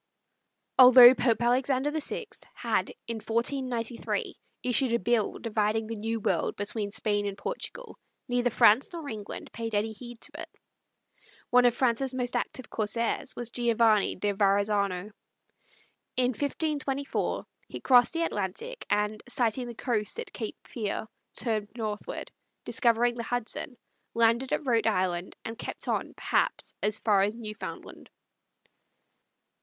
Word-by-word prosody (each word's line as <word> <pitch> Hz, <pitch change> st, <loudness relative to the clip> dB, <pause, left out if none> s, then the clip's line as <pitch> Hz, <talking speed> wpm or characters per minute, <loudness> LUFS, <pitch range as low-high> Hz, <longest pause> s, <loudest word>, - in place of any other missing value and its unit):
Although 250 Hz, -1 st, +11 dB
Pope 235 Hz, -2 st, +1 dB
Alexander 260 Hz, +3 st, +2 dB
VI 315 Hz, +9 st, -2 dB, 0.3 s
had, -, -, 0 dB, 0.2 s
in 230 Hz, -1 st, -4 dB
1493, 235 Hz, +1 st, -2 dB, 0.3 s
issued 250 Hz, 0 st, +4 dB
a -, -, +4 dB
bull 230 Hz, 0 st, 0 dB
dividing 220 Hz, -1 st, 0 dB
the 225 Hz, +1 st, -5 dB
New 225 Hz, +2 st, -2 dB
World -, -, 0 dB
between 205 Hz, 0 st, -3 dB
Spain 205 Hz, 0 st, 0 dB
and 200 Hz, -1 st, -5 dB
Portugal, -, -, -6 dB, 0.3 s
neither 245 Hz, 0 st, +1 dB
France 225 Hz, +2 st, +4 dB
nor 330 Hz, -4 st, -6 dB
England 215 Hz, -5 st, -7 dB
paid 225 Hz, -1 st, -4 dB
any 210 Hz, +2 st, 0 dB
heed 240 Hz, +2 st, -10 dB
to 290 Hz, +3 st, -8 dB
it. -, -, -8 dB, 1.0 s
One 245 Hz, 0 st, +6 dB
of 240 Hz, -1 st, +4 dB
France's 255 Hz, +1 st, +1 dB
most 245 Hz, -1 st, -2 dB
active 260 Hz, -, -3 dB
corsairs 225 Hz, +2 st, -1 dB
was 240 Hz, -1 st, -5 dB
Giovanni 230 Hz, -3 st, +3 dB
da 205 Hz, +2 st, -1 dB
Verazzano. 200 Hz, -1 st, +1 dB, 1.1 s
In 250 Hz, -1 st, +3 dB
1524 280 Hz, +1 st, -2 dB, 0.2 s
he -, -, -7 dB
crossed 245 Hz, 0 st, +5 dB
the 335 Hz, 0 st, 0 dB
Atlantic, 330 Hz, -, -4 dB
and, 210 Hz, +1 st, 0 dB
sighting 245 Hz, 0 st, 0 dB
the 240 Hz, -, -7 dB
coast 230 Hz, -, -1 dB
at 470 Hz, -3 st, -6 dB
Cape 220 Hz, -3 st, -5 dB
Fear, 220 Hz, -2 st, -3 dB, 0.3 s
turned 215 Hz, -3 st, -1 dB
northward, 215 Hz, -2 st, -4 dB, 0.3 s
discovered 240 Hz, 0 st, +2 dB
the -, -, -2 dB
Hudson, 245 Hz, +2 st, -3 dB, 0.4 s
landed 230 Hz, +3 st, +3 dB
at -, -, -1 dB
Rhode 230 Hz, -4 st, +2 dB
Island, 185 Hz, -3 st, 0 dB
and 225 Hz, 0 st, -6 dB
kept -, -, -6 dB
on, -, -, -2 dB
perhaps, -, -, 0 dB
as 210 Hz, +1 st, 0 dB
far 205 Hz, -3 st, +3 dB
as 205 Hz, +3 st, +1 dB
Newfoundland. 215 Hz, -2 st, -8 dB
230 Hz, 135 wpm, -28 LUFS, 210-250 Hz, 1.1 s, Although